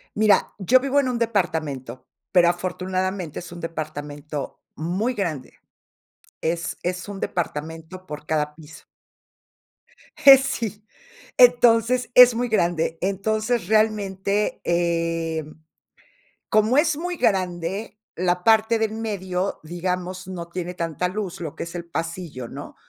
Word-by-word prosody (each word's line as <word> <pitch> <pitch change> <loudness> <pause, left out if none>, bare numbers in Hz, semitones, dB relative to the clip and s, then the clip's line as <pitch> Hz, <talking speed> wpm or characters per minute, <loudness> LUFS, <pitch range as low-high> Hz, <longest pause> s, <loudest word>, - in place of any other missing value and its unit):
Mira, 215 -1 +3
yo 245 +7 +5
vivo 275 +2 +1
en 260 -2 +1
un 245 - -1
departamento, 160 - -2 0.3
pero 175 -2 +5
afortunadamente 185 -1 -2
es 175 - -10
un 175 - -8
departamento 150 -2 -6 0.2
muy 185 - -1
grande. 160 - -3 0.9
Es 165 +1 -2
es 180 +1 -3
un 200 -1 -6
departamento 165 +2 -4
por 150 0 -8
cada 150 -1 -1
piso. 155 -3 -14 1.3
Eh, 275 -3 +10
sí. 220 -6 -3 0.5
Entonces, 245 0 +5
es 250 -2 +9
muy 245 +1 0
grande. 170 -6 0
Entonces, 215 +3 0
realmente, 210 -2 +1
eh, 165 -2 0 1.1
como 215 +5 +3
es 310 -1 +3
muy 355 +2 -3
grande 190 - -1 0.2
la 180 0 0
parte 225 +1 +4
de 220 - +3
en 220 +1 -5
medio, 190 -3 -2
digamos, 180 +2 -4
no 175 -2 -6
tiene 180 0 -4
tanta 170 0 -2
luz, 190 -3 -5
lo 155 -3 -5
que - - -4
es 170 +1 -9
el 175 -1 -5
pasillo, 165 -6 -5
¿no?, - - -9
185 Hz, 130 wpm, -23 LUFS, 165-215 Hz, 1.3 s, Eh